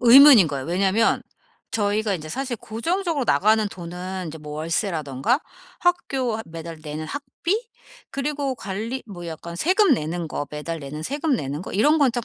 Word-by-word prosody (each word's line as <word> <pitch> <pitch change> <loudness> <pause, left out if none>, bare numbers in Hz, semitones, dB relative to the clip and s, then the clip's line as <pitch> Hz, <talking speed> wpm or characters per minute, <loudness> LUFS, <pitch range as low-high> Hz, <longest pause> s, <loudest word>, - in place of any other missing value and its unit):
의문인 245 - +9
거예요. 140 -2 -4
왜냐면 195 +6 +2 0.5
저희가 210 -1 +1
인제 155 -3 -6
사실 260 - -3
고정적으로 325 - -1
나가는 215 +8 +4
돈은 180 0 -6
인제 160 0 -7
뭐 150 -1 -8
월세라든가 160 - 0 0.4
학교 270 -10 +1
하 220 - -5
매달 165 0 -8
내는 155 +1 -5
학비 285 - -2 0.5
그리고 280 -1 -2
관리 225 +4 -4
뭐 175 -4 -8
약간 170 +1 -7
세금 375 - +4
내는 165 -3 -3
거 145 - -3
매달 155 +2 -4
내는 150 +2 -6
세금 290 - 0
내는 145 -1 -4
거 - - -7
이런 295 +10 +4
건 280 -4 +5
딱 240 -1 -2
200 Hz, 340 characters per minute, -24 LUFS, 160-265 Hz, 0.5 s, 의문인